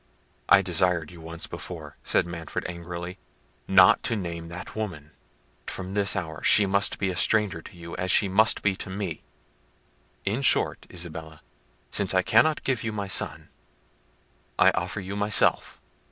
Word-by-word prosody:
"I 95 Hz, -, +7 dB
desired 90 Hz, -2 st, 0 dB
you 85 Hz, -2 st, -13 dB
once 85 Hz, +1 st, -5 dB
before," -, -, -8 dB
said -, -, +2 dB
Manfred 85 Hz, -2 st, -6 dB
angrily, 85 Hz, +1 st, -7 dB, 0.5 s
"not 95 Hz, -1 st, +6 dB
to 115 Hz, -, 0 dB
name 85 Hz, -4 st, -5 dB
that 90 Hz, +3 st, -9 dB
woman: 85 Hz, -9 st, -5 dB, 0.6 s
from 95 Hz, +1 st, -5 dB
this 100 Hz, -1 st, +2 dB
hour 80 Hz, -5 st, -5 dB
she 105 Hz, -, +6 dB
must 100 Hz, +1 st, +1 dB
be 95 Hz, -2 st, -1 dB
a -, -, -6 dB
stranger 105 Hz, -4 st, +1 dB
to 90 Hz, -, -14 dB
you, 85 Hz, 0 st, -8 dB
as 90 Hz, -, -3 dB
she 100 Hz, -, +5 dB
must 110 Hz, +4 st, +2 dB
be 100 Hz, -2 st, +2 dB
to 100 Hz, -, -5 dB
me. 95 Hz, -4 st, -5 dB, 1.0 s
In 105 Hz, +7 st, -1 dB
short, 135 Hz, -, +2 dB
Isabella, 80 Hz, -3 st, -8 dB, 0.5 s
since 95 Hz, -2 st, +2 dB
I 95 Hz, -, +3 dB
cannot 150 Hz, +10 st, +3 dB
give 130 Hz, -5 st, -1 dB
you 115 Hz, -, -2 dB
my 100 Hz, -2 st, -4 dB
son, 95 Hz, -, 0 dB, 1.1 s
I -, -, +6 dB
offer -, -, -3 dB
you 95 Hz, +1 st, -6 dB
myself." 105 Hz, 0 st, +2 dB
95 Hz, 160 wpm, -26 LUFS, 85-100 Hz, 1.1 s, I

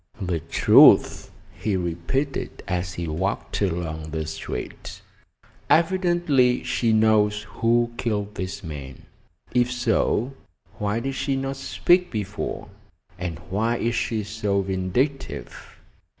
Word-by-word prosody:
"The 90 Hz, -4 st, -1 dB
truth," 80 Hz, -, +5 dB, 0.2 s
he 105 Hz, -3 st, -2 dB
repeated, 90 Hz, -, -3 dB
as 90 Hz, -1 st, -2 dB
he 85 Hz, -1 st, -4 dB
walked 95 Hz, +8 st, -2 dB
along 80 Hz, -4 st, -2 dB
the 80 Hz, 0 st, -3 dB
street. 80 Hz, -, -6 dB, 0.7 s
"Evidently 170 Hz, -7 st, +3 dB
she 125 Hz, -2 st, +1 dB
knows 105 Hz, -1 st, +3 dB
who 120 Hz, +3 st, +1 dB
killed 105 Hz, -4 st, -2 dB
this 95 Hz, -1 st, -5 dB
man. 70 Hz, -5 st, -8 dB, 0.5 s
If 125 Hz, 0 st, +2 dB
so, 120 Hz, +1 st, +1 dB, 0.5 s
why 105 Hz, +2 st, -1 dB
did 135 Hz, +2 st, -3 dB
she 135 Hz, +1 st, -1 dB
not 135 Hz, 0 st, -3 dB
speak 180 Hz, +6 st, +2 dB
before, 105 Hz, -2 st, -4 dB, 0.5 s
and 90 Hz, -2 st, -4 dB
why 115 Hz, +4 st, +1 dB
is 115 Hz, 0 st, -1 dB
she 115 Hz, -2 st, -1 dB
so 105 Hz, -1 st, -1 dB
vindictive? 95 Hz, +9 st, -3 dB
105 Hz, 115 wpm, -24 LUFS, 90-125 Hz, 0.7 s, truth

